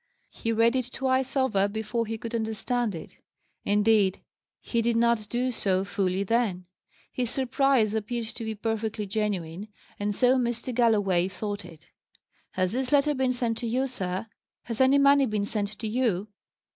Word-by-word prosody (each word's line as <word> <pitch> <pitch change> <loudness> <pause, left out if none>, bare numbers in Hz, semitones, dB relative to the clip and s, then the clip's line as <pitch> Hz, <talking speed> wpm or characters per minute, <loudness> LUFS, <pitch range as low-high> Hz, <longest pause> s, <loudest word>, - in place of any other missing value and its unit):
He 230 - -3
read 230 +2 +3
it 255 -2 -1
twice 265 0 0
over 220 -7 +2
before 220 +2 -2
he 225 +1 -3
could 230 +1 -7
understand 225 0 -1
it; 160 - -10 0.5
indeed, 205 -2 +3 0.4
he 235 - -1
did 235 0 +1
not 230 -2 +2
do 250 +1 0
so 190 -5 +1
fully 195 -1 0
then. 200 -4 0 0.5
His 245 -2 -1
surprise 260 -4 +2
appeared 225 +2 -2
to 230 +1 -3
be 220 -1 -3
perfectly 220 0 -2
genuine, 195 -3 -2 0.3
and 205 0 -1
so 255 +3 +4
Mr. 240 +1 -2
Galloway 205 -7 +3
thought 205 +2 -5
it. 165 -3 -15 0.6
"Has 185 -1 0
this 255 +2 -2
letter 295 +1 +4
been 260 -2 +1
sent 240 -2 -1
to 240 - -3
you, 255 +4 +1
sir? 190 -7 -3 0.4
Has 230 0 -3
any 260 +2 +5
money 280 -1 +5
been 210 -2 -1
sent 205 0 -3
to 220 - -4
you?" 215 -4 0
225 Hz, 165 wpm, -27 LUFS, 205-245 Hz, 0.6 s, any